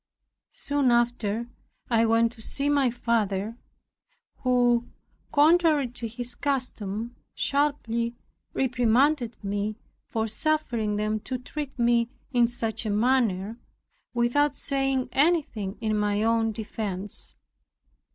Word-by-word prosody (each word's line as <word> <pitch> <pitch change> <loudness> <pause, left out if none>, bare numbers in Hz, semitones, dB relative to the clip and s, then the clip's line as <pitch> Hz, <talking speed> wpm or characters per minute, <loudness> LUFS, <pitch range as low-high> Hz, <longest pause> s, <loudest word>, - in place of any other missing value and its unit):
Soon 285 - 0
after 235 -2 +1 0.4
I 230 -1 +3
went 230 +1 +3
to 235 -2 -14
see 280 +5 -1
my 280 -3 +3
father, 225 -3 -1 0.8
who, 245 -1 +2 0.4
contrary 305 -2 +4
to 235 -1 -5
his 240 +2 -4
custom, 240 -5 -3 0.2
sharply 235 -5 0 0.4
reprimanded 250 0 +2
me, 205 +1 -2 0.3
"for 225 -1 -1
suffering 230 -3 0
them 215 +1 0
to 255 +4 -4
treat 280 +3 -6
me 235 -1 +3 0.2
in 240 -2 +4
such 230 -2 -1
a 220 - -2
manner, 220 -2 +1 0.5
without 265 +4 +2
saying 270 -2 0
anything 275 - +1
in 215 -1 0
my 210 0 +1
own 225 0 +2
defence." 205 -2 -4
235 Hz, 110 wpm, -26 LUFS, 220-265 Hz, 0.8 s, contrary